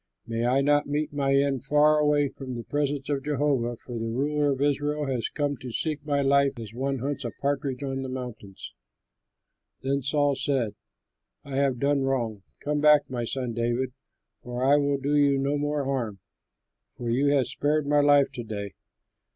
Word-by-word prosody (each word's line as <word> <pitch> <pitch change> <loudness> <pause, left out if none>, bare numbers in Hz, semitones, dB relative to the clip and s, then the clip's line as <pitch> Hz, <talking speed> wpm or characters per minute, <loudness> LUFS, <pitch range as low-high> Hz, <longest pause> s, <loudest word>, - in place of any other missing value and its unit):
May 115 +1 -1
I 130 +2 +3
not 145 +1 +3
meet 145 +1 -2
my 140 -1 +1
end 140 -2 +1
far 150 +2 +4
away 150 -1 +3
from 130 -1 -8
the 120 -1 -5
presence 145 0 -2
of 140 -2 -1
Jehovah, 140 -5 0
for 120 0 -7
the 115 0 -3
ruler 145 +4 0
of 135 - -2
Israel 145 +1 0
has 130 -4 -2
come 145 -1 -1
out 140 - -6
to 130 - -7
seek 150 +3 -2
my 145 -2 0
life, 140 -1 +3
as 110 -2 -8
one 135 +3 -1
hunts 140 +2 -3
a 120 - -2
partridge 140 -1 -1
on 135 -1 -3
the 130 - -5
mountains." 120 -7 -7 1.1
Then 140 +1 0
Saul 145 +1 +2
said, 130 -5 0 0.7
"I 135 -1 -5
have 135 -2 +2
done 140 +2 +1
wrong. 120 -6 -1 0.2
Come 150 0 -1
back, 150 -2 +5
my 120 -2 -2
son 125 0 -2
David, 120 +2 -1 0.5
for 125 +1 -4
I 140 +2 +5
will 140 -1 +1
do 140 +2 -1
you 140 -1 +4
no 140 +2 0
more 145 0 -1
harm, 125 -7 -2 0.8
for 120 -1 -3
you 135 +4 +2
have 140 -3 +3
spared 150 +3 0
my 145 +1 +3
life 145 -1 +5
to 120 - -6
day. 100 -3 -5
140 Hz, 190 wpm, -26 LUFS, 125-145 Hz, 1.1 s, back